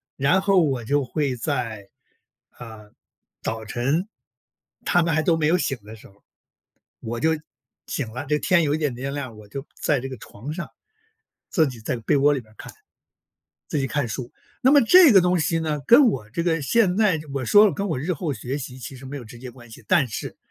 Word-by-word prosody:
然 140 +8 +2
后 195 -2 +4
我 135 -6 -1
就 145 +3 +1
会 135 0 -2
在， 110 -3 -4 0.7
呃， 110 -3 -11 0.5
早 110 0 -4
晨 135 - -1 0.8
他 175 - +3
们 165 -1 0
还 155 - +1
都 165 0 +3
没 155 -2 +1
有 175 - +3
醒 135 -6 -1
的 110 +2 -11
时 110 - -15
候， 100 +1 -25 0.8
我 115 +1 -5
就 160 - +2 0.6
醒 120 -6 -4
了， 130 +4 -6
这 150 +2 +1
天 175 -3 +3
有 145 0 +1
一 - - 0
点 150 -4 -1
点 135 +3 -5
亮， 130 -6 -6
我 105 -1 -13
就 135 +6 -7 0.2
在 145 -4 +1
这 135 - -5
个 130 - -7
床 120 +5 -9
上， 170 +2 -6 0.8
自 160 -6 +2
己 125 -3 -9
在 115 +3 -3
被 115 +4 0
窝 145 +1 +4
里 140 - -1
面 110 -3 -19
儿 - - -22
看， - - -10 1.0
自 - - -1
己 135 - 0
看 130 -1 -2
书。 120 +3 -6 0.3
那 260 - +5
么 290 - +7
这 325 +3 +7
个 190 - +7
东 180 0 +2
西 165 +1 0
呢， 155 -2 -2
跟 260 +4 +7
我 110 - -1
这 170 - -2
个 165 -3 0
现 195 +3 +2
在 200 -8 +2
我 135 - -2
说 205 - +6
跟 200 0 -2
我 155 -7 -2
日 175 +7 -2
后 155 0 -3
学 130 +2 -4
习 130 -2 -7
其 130 +2 -8
实 135 - -12
没 140 +2 -6
有 125 - -10
直 120 +1 -12
接 125 +1 -9
关 120 -2 -16
系， 110 - -13
但 140 -7 +3
是 105 - -6
140 Hz, 235 characters per minute, -23 LUFS, 120-165 Hz, 1.0 s, 么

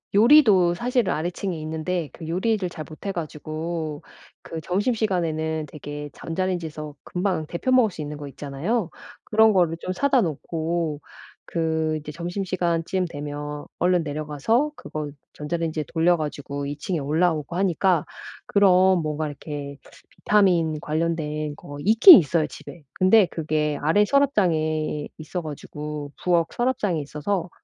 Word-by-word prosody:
요리도 210 - +6
사실은 245 +1 0
아래층에 175 +3 -3
있는데 160 +1 -3
그 160 - -9
요리를 190 +3 0
잘 160 -3 -7
못해 165 +5 -5
가지고 155 -1 -4 0.4
그 160 - -7
점심시간에는 175 -6 -1
대개 145 0 -7
전자레인지에서 165 -4 -4
금방 180 -3 -1
데워 215 +11 -1
먹을 235 -5 +4
수 160 - -7
있는 150 0 -5
거 145 -1 -7
있잖아요. 155 - -2 0.4
그런 220 0 +5
거를 170 -3 +2
좀 185 - -3
사다 270 +5 +3
놓고 160 -2 -2 0.5
그 160 -1 0
이제 150 0 -8
점심시간쯤 175 +1 -1
되면 145 -1 -6
얼른 180 -1 +3
내려가서 155 - 0
그거 150 - -6 0.2
전자레인지에 160 0 -3
돌려 170 +1 +3
가지고 145 -2 -4
2 145 0 -5
층에 170 +4 -2
올라오고 155 +2 0
하니까 185 -3 +2 0.4
그런 190 -2 +5
뭔가 155 0 -2
이렇게 145 -1 -7 0.3
비타민 175 -7 +2
관련된 155 -1 -2
거 145 0 -10
있긴 225 - +10
있어요, 155 0 0
집에. 170 - -11
근데 190 +3 +5
그게 150 -2 -1
아래 165 +8 +3
서랍장에 160 - +1
있어 160 +3 -5
가지고 150 -1 -6
부엌 170 -2 +3
서랍장에 215 -9 0
있어서 165 +5 -3
165 Hz, 315 characters per minute, -24 LUFS, 150-185 Hz, 0.5 s, 있긴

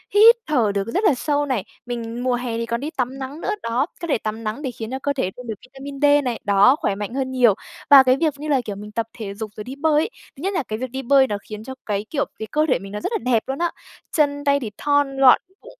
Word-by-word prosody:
hít 455 +3 +9
thở 245 -9 +2
được 200 +1 -1
rất 380 - -1
là 400 - +5
sâu 290 +3 0
này. 255 -8 -1 0.2
Mình 240 0 -4
mùa 255 - +1
hè 245 -2 -3
thì 230 - -2
còn 235 0 -2
đi 290 - -4
tắm 260 +1 -2
nắng 275 +4 -6
nữa, - - -2
đó, 240 +4 +1 0.2
có 340 - -3
thể 295 - +2
tắm 220 +1 -5
nắng 215 +7 -3
để 265 - -3
khiến 225 -1 -7
cho 265 - -3
cơ 285 +1 -1
thể 225 -9 -1
thêm 250 - -9
được 225 - -2
vitamin 275 +2 -9
D 290 - +5 0.2
này, 240 -2 -2
đó, 205 +6 +5
khỏe 200 - 0
mạnh 205 +3 -5
hơn 260 -1 -2
nhiều. 245 -4 +5 0.4
Và 275 -2 +10
cái 255 0 +4
việc 315 -3 +2
như 300 - -6
là, 275 -4 +2
kiểu, 205 - -4
mình 210 +1 -9
tập 225 +1 -2
thể 205 -3 -5
dục 215 +1 -6
rồi 210 - -6
đi 255 +5 -7
bơi 300 +1 +2
ấy, - - -2 0.3
thứ 270 - -12
nhất 390 - 0
là 350 - 0
cái 215 -2 -5
việc 255 -1 -4
đi 265 +1 -4
bơi 270 +1 +4
nó 205 -3 -2
khiến 215 0 -7
cho 265 +3 -7
cái, 205 0 -2
kiểu, 285 -3 0
cái 220 - -4
cơ 305 +1 +2
thể 255 - +3
mình 195 +1 -9
nó 210 - -4
rất - - -3
là 445 - +1
đẹp 225 -2 +3
luôn 270 +2 -3
á. 345 -1 +1 0.5
Chân 285 -1 +2
tay 280 0 +3
thì 230 -6 -5
thon 285 -2 +1
gọn, 265 -2 +7 0.2
bụng - - -13
255 Hz, 295 wpm, -22 LUFS, 225-285 Hz, 0.5 s, Và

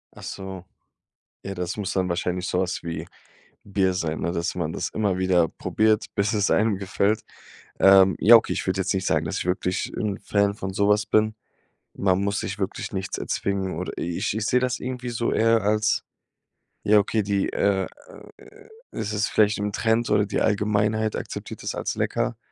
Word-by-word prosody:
Ach - - -12
so. 95 -2 -7 0.8
Ja, 100 - -4
das 90 -1 -3
muss 100 -3 -3
dann 95 -1 0
wahrscheinlich 90 +1 -2
so 90 - 0
was 95 0 -2
wie 85 -1 -5 0.6
Bier 95 -2 +1
sein, 80 -3 -2
ne, 85 - -1
dass 85 0 -2
man 85 -3 -2
das - - -3
immer 100 -4 -1
wieder 90 -3 +3
probiert, 110 0 +1
bis 100 +2 +1
es 105 -2 +1
einem 110 -3 +2
gefällt. 100 +2 0 0.6
Ähm, 95 -1 +7
ja, 115 +2 +8
okay, 115 - +4
ich - - -3
würde 95 +1 +1
jetzt 95 - 0
nicht 95 -1 -2
sagen, - - +1
dass - - -2
ich - - -4
wirklich 90 0 -1
'n 105 -3 -2
Fan 100 0 +1
von 95 -2 -5
so 100 +1 +1
was 105 0 +3
bin. 110 0 +2 0.6
Man 95 -1 +1
muss 100 +2 0
sich 100 - -4
wirklich 95 +3 -4
nichts 95 -1 -3
erzwingen 95 -3 -2
oder 90 - -4
ich 85 +2 -2
ich 110 - -1
sehe 125 +3 +2
das 125 0 -1
irgendwie 125 -1 -5
so 115 0 -1
eher 115 0 +3
als 105 +1 +1 0.8
ja 105 0 +5
okay, 105 +2 +2
die, 100 -1 0
äh, 100 -1 +1 0.5
äh, - - -17 0.2
es 105 - -4
ist 105 -1 +1
vielleicht 105 -1 +3
im 105 0 -1
Trend 115 +1 +1
oder 105 - +3
die 100 - -2
Allgemeinheit 105 +1 +1
akzeptiert - - -7
das - - -3
als - - -3
lecker. - - -1
100 Hz, 190 wpm, -24 LUFS, 95-105 Hz, 0.8 s, ja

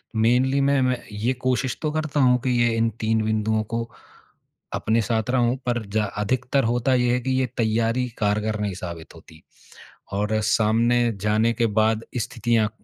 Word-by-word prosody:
mainly 125 +5 +2
मैं 140 0 +2
मैं 125 -1 0
ये 110 +5 -1
कोशिश 130 0 0
तो 155 - 0
करता 155 -1 -2
हूँ 125 -1 +5
कि 130 - -1
ये 120 -1 +2
इन 115 0 +2
3 110 0 +1
बिंदुओं 110 0 0
को 115 +2 -3 0.9
अपने 115 +1 +1
साथ 110 +1 -1
रहूँ, 125 -1 +2
पर 120 -2 0
जा 110 - +3 0.2
अधिकतर 130 +5 0
होता 120 +3 +1
ये 125 -1 +2
है 125 - +1
कि 130 +2 -2
ये 130 - +2
तैयारी 115 +2 +1
कारगर 105 0 0
नहीं 100 -2 -2
साबित 85 -3 -8
होती 80 -1 -16 0.7
और 105 +2 0
सामने 115 +3 +2
जाने 110 +3 +2
के 120 0 0 0.2
बाद 110 +1 +1
स्थितियाँ 115 -2 0
115 Hz, 170 wpm, -23 LUFS, 110-125 Hz, 0.9 s, हूँ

